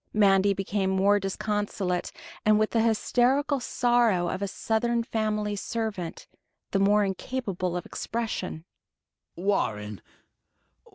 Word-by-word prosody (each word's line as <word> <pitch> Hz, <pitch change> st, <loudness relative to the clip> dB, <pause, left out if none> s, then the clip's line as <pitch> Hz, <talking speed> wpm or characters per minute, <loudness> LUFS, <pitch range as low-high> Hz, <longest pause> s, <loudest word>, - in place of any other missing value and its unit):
Mandy 200 Hz, -1 st, +4 dB
became 195 Hz, 0 st, -1 dB
more 195 Hz, +2 st, +3 dB
disconsolate, 195 Hz, -2 st, -2 dB, 0.3 s
and, 215 Hz, 0 st, +5 dB
with 215 Hz, 0 st, +1 dB
the 225 Hz, -, +2 dB
hysterical 255 Hz, +5 st, +2 dB
sorrow 240 Hz, -8 st, +2 dB
of 185 Hz, -, -3 dB
a 200 Hz, -, 0 dB
Southern 230 Hz, +4 st, 0 dB
family 215 Hz, -3 st, -1 dB
servant, 205 Hz, -5 st, -4 dB, 0.5 s
the 195 Hz, -, +1 dB
more 205 Hz, +1 st, +4 dB
incapable 190 Hz, -3 st, -3 dB
of 175 Hz, -, -5 dB
expression. 220 Hz, -8 st, -4 dB, 0.7 s
"Warren 105 Hz, -, -1 dB
205 Hz, 110 wpm, -27 LUFS, 190-225 Hz, 0.7 s, and